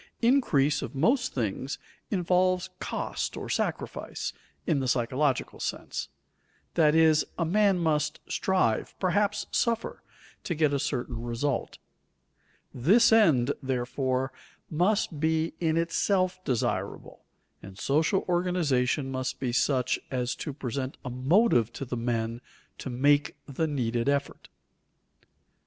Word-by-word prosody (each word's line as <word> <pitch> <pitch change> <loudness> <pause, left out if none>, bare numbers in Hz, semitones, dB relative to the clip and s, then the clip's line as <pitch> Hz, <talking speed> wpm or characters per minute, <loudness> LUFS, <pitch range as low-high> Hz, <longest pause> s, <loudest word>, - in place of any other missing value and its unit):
Increase 195 - +3
of - - -6
most 245 - +2
things 125 +3 -2 0.3
involves 185 0 +1
"cost" - - -3
or - - -6
sacrifice, - - -3 0.3
in 155 -5 +1
the 130 - -1
psychological 130 +3 0
sense; - - -4 0.6
that 155 -2 +4
is, 160 -1 +5
man 195 +3 +3
must 155 -3 0
strive, 185 - 0
perhaps 200 +3 +1
suffer, 230 -1 0 0.4
to 170 - -2
get 150 -2 +2
a 140 - +1
certain 125 -4 -3
result. 120 +3 -2 1.0
This 200 - +4
end, 155 - +5
therefore, 130 0 -1 0.4
must 175 -1 +1
be 160 +1 +1
in 160 -1 +1
itself 185 +2 +1
desirable, 130 -8 -2 0.4
and 95 0 -11
social 155 - +1
organization 155 -7 +1
must 130 -1 -3
be 130 -2 -1
such 130 0 +1
as 125 -1 -1
to 150 - -4
present 135 -1 -4
a 125 - -4
motive 130 - +3
to 135 - -5
the 125 - -4
men 115 0 -2 0.4
to - - -5
make 145 +3 +2
the 150 +3 -2
needed 120 -3 -1
effort. 140 0 -2
145 Hz, 120 wpm, -28 LUFS, 130-180 Hz, 1.0 s, is